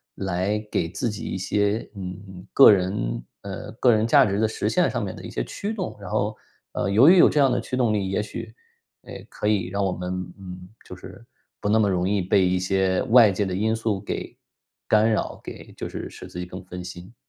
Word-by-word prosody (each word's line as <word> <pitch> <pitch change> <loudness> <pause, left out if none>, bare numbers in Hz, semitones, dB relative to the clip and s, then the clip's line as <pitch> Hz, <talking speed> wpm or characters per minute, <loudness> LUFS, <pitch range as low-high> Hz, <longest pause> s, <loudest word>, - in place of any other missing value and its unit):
来 95 +2 -1
给 85 - 0
自 100 +8 -3
己 105 - -6
一 - - -3
些， 100 +3 0
嗯， 95 -1 -8
个 135 - +9
人 75 -12 -1 0.2
呃， 100 -1 -7
个 120 +1 +3
人 110 +1 +2
价 140 +2 +6
值 100 0 -1
的 110 - +3
实 105 - -3
现 180 +9 +2
上 120 -4 -2
面 95 - -6
的 - - -11
一 - - -7
些 - - -3
驱 205 - -5
动。 190 -4 -4
然 - - -8
后， - - -1 0.4
呃， - - -1
由 110 +8 +6
于 185 - +7
有 - - +7
这 150 - 0
样 135 -2 +5
的 125 -1 0
驱 125 - -4
动 120 -4 +2
力， 95 -2 -1
也 100 +2 -1
许， 115 +1 -8 0.5
呃， - - -11 0.2
可 105 - -4
以 100 -4 +1
让 100 +1 -1
我 95 - 0
们 90 0 -4 0.3
嗯， 90 -1 -9 0.2
就 90 - -9
是 115 +5 -12 0.4
不 105 - -1
那 110 - +4
么 110 -2 +3
容 90 0 0
易 100 -2 +1
被 95 +1 +3
一 90 0 +1
些 95 0 +1
外 115 -4 +7
界 100 +2 -1
的 95 - -3
因 110 +4 0
素 110 -3 -2
给 100 - -5 0.5
干 110 +1 +4
扰， - - -2
给 - - -10
就 - - -4
是 - - -6
使 - - -11
自 90 - -8
己 90 - -4
更 90 +1 -9
分 90 0 -7
心。 90 +4 -10
100 Hz, 250 characters per minute, -24 LUFS, 90-110 Hz, 0.5 s, 个